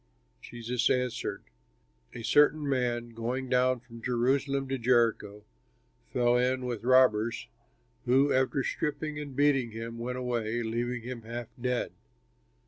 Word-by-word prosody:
Jesus 120 Hz, +1 st, -2 dB
answered, 125 Hz, -2 st, -1 dB, 0.7 s
"A 115 Hz, -, -7 dB
certain 150 Hz, +3 st, +4 dB
man 120 Hz, -3 st, 0 dB
going 120 Hz, +3 st, -4 dB
down 125 Hz, -1 st, +2 dB
from 115 Hz, -2 st, -13 dB
Jerusalem 135 Hz, +3 st, 0 dB
to 135 Hz, -1 st, -2 dB
Jericho 115 Hz, -4 st, +1 dB, 0.7 s
fell 120 Hz, 0 st, +3 dB
in 130 Hz, +1 st, +1 dB
with 120 Hz, -3 st, -4 dB
robbers 120 Hz, -3 st, +3 dB, 0.6 s
who 135 Hz, +3 st, +4 dB
after 130 Hz, +1 st, +1 dB
stripping 150 Hz, +1 st, -3 dB
and 145 Hz, -3 st, -7 dB
beating 140 Hz, -3 st, +3 dB
him 115 Hz, +1 st, -7 dB
went 125 Hz, +2 st, -3 dB
away, 120 Hz, -2 st, -2 dB
leaving 120 Hz, +1 st, -2 dB
him 125 Hz, -1 st, -6 dB
half 115 Hz, +1 st, -6 dB
dead. 125 Hz, 0 st, -1 dB
125 Hz, 130 wpm, -29 LUFS, 115-130 Hz, 0.7 s, certain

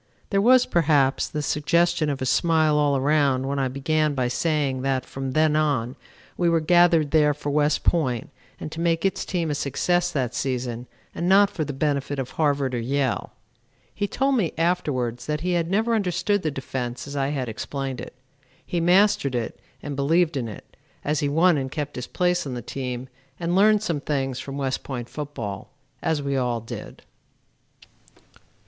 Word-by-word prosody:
There 195 Hz, -1 st, +3 dB
was, 250 Hz, +3 st, +6 dB
perhaps, 145 Hz, -5 st, +2 dB
the 150 Hz, -1 st, -4 dB
suggestion 165 Hz, +2 st, +1 dB
of 135 Hz, -2 st, -2 dB
a -, -, -1 dB
smile 160 Hz, +2 st, +3 dB
all 145 Hz, -2 st, +3 dB
around 140 Hz, -2 st, +2 dB
when 140 Hz, 0 st, -1 dB
I 135 Hz, -, +1 dB
began 150 Hz, +3 st, 0 dB
by 125 Hz, -2 st, 0 dB
saying 145 Hz, -2 st, 0 dB
that 130 Hz, -1 st, 0 dB
from 135 Hz, -1 st, -5 dB
then 155 Hz, 0 st, +3 dB
on 140 Hz, -5 st, 0 dB, 0.4 s
we 175 Hz, -1 st, +2 dB
were 165 Hz, -1 st, +3 dB
gathered 165 Hz, -2 st, +4 dB
there 150 Hz, -2 st, +4 dB
for 145 Hz, 0 st, -4 dB
West 150 Hz, 0 st, +2 dB
Point 130 Hz, -9 st, 0 dB, 0.3 s
and 155 Hz, -, -6 dB
to 160 Hz, -, -7 dB
make 165 Hz, +1 st, +1 dB
its 195 Hz, -, 0 dB
team 170 Hz, -4 st, -1 dB
a -, -, 0 dB
success 175 Hz, +6 st, 0 dB
that 130 Hz, -6 st, -1 dB
season 125 Hz, -2 st, -3 dB, 0.3 s
and 175 Hz, +1 st, -2 dB
not 200 Hz, +1 st, +6 dB
for 160 Hz, -, -2 dB
the 145 Hz, -, -4 dB
benefit 140 Hz, 0 st, -1 dB
of 130 Hz, -2 st, -4 dB
Harvard 145 Hz, -4 st, 0 dB
or 120 Hz, -, -1 dB
Yale. 130 Hz, +1 st, -1 dB, 0.6 s
He 205 Hz, -, -2 dB
told 270 Hz, +4 st, +1 dB
me 180 Hz, -9 st, 0 dB
afterwards 130 Hz, -8 st, -1 dB
that 150 Hz, 0 st, -1 dB
he 180 Hz, +2 st, -1 dB
had 170 Hz, -1 st, 0 dB
never 220 Hz, +5 st, +1 dB
understood 205 Hz, 0 st, +1 dB
the 155 Hz, -, -1 dB
defense 125 Hz, -3 st, -5 dB
as 140 Hz, 0 st, -7 dB
I 135 Hz, -1 st, 0 dB
had 140 Hz, -3 st, -2 dB
explained 135 Hz, +4 st, -4 dB
it. -, -, -9 dB, 0.5 s
He 175 Hz, -, -2 dB
mastered 175 Hz, -6 st, +3 dB
it 120 Hz, -2 st, -3 dB, 0.2 s
and 145 Hz, -1 st, -4 dB
believed 160 Hz, +4 st, +2 dB
in 125 Hz, -4 st, -2 dB
it, 105 Hz, -, -11 dB, 0.3 s
as 150 Hz, 0 st, +1 dB
he 145 Hz, -, 0 dB
won 160 Hz, +1 st, +4 dB
and 130 Hz, -1 st, -3 dB
kept 145 Hz, -2 st, -4 dB
his 125 Hz, -, -5 dB
place 180 Hz, -3 st, 0 dB
on 130 Hz, -, -4 dB
the 120 Hz, -, -6 dB
team 125 Hz, 0 st, -5 dB, 0.3 s
and 170 Hz, 0 st, -1 dB
learned 210 Hz, +2 st, +5 dB
some 165 Hz, -8 st, -1 dB
things 135 Hz, -4 st, -2 dB
from 140 Hz, 0 st, -6 dB
West 135 Hz, -2 st, -2 dB
Point 125 Hz, -3 st, -5 dB
football, 120 Hz, -10 st, -6 dB, 0.3 s
as 155 Hz, -3 st, 0 dB
we 140 Hz, 0 st, -1 dB
all 125 Hz, -3 st, 0 dB
did. 115 Hz, -, -9 dB
145 Hz, 185 wpm, -24 LUFS, 135-170 Hz, 0.6 s, was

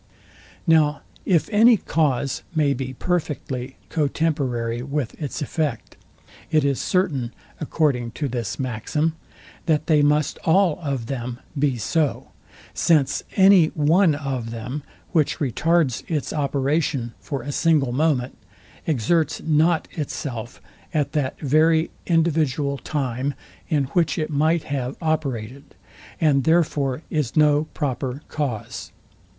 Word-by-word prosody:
Now 155 Hz, -3 st, +3 dB, 0.3 s
if 175 Hz, -5 st, +3 dB
any 225 Hz, +2 st, +6 dB
cause 140 Hz, -6 st, 0 dB
may 145 Hz, -3 st, +3 dB
be 130 Hz, 0 st, -4 dB
perfectly 135 Hz, -6 st, -3 dB
co 150 Hz, -3 st, +1 dB
temporary 130 Hz, -7 st, -1 dB
with 140 Hz, -2 st, -3 dB
its 145 Hz, 0 st, -3 dB
effect, 155 Hz, 0 st, -3 dB, 0.5 s
it 155 Hz, -3 st, +3 dB
is 140 Hz, -2 st, +1 dB
certain, 145 Hz, -10 st, 0 dB, 0.3 s
according 140 Hz, -6 st, 0 dB
to 145 Hz, -, -2 dB
this 120 Hz, -5 st, -3 dB
maxim, 135 Hz, +6 st, -1 dB, 0.5 s
that 155 Hz, -1 st, +2 dB
they 155 Hz, -2 st, +4 dB
must 150 Hz, 0 st, +2 dB
all 180 Hz, -1 st, +3 dB
of 135 Hz, -6 st, -2 dB
them 120 Hz, -1 st, -4 dB, 0.2 s
be 140 Hz, -3 st, +1 dB
so; 150 Hz, +6 st, -1 dB, 0.4 s
since 155 Hz, -5 st, +2 dB
any 190 Hz, -4 st, +7 dB
one 160 Hz, +2 st, +4 dB
of 135 Hz, -5 st, -3 dB
them, 120 Hz, +5 st, -5 dB, 0.3 s
which 155 Hz, -4 st, +2 dB
retards 150 Hz, 0 st, +1 dB
its 155 Hz, -4 st, -2 dB
operation 140 Hz, -3 st, 0 dB
for 140 Hz, -4 st, -5 dB
a 145 Hz, -, -4 dB
single 150 Hz, -4 st, +2 dB
moment, 130 Hz, -2 st, +1 dB, 0.5 s
exerts 155 Hz, +3 st, +1 dB
not 160 Hz, +1 st, +2 dB
itself 130 Hz, -6 st, -5 dB, 0.4 s
at 145 Hz, -2 st, +1 dB
that 145 Hz, -4 st, -2 dB
very 160 Hz, +3 st, +3 dB, 0.2 s
individual 155 Hz, -4 st, +1 dB
time, 135 Hz, 0 st, -2 dB, 0.3 s
in 150 Hz, -4 st, +2 dB
which 170 Hz, -1 st, +2 dB
it 155 Hz, -1 st, -2 dB
might 155 Hz, +3 st, +2 dB
have 135 Hz, -1 st, -3 dB
operated; 140 Hz, -6 st, -3 dB, 0.4 s
and 140 Hz, -4 st, +3 dB
therefore 150 Hz, -3 st, +1 dB
is 150 Hz, -7 st, -1 dB
no 150 Hz, -1 st, +4 dB
proper 135 Hz, 0 st, -3 dB
cause. 135 Hz, -9 st, -4 dB
145 Hz, 125 wpm, -23 LUFS, 130-160 Hz, 0.5 s, any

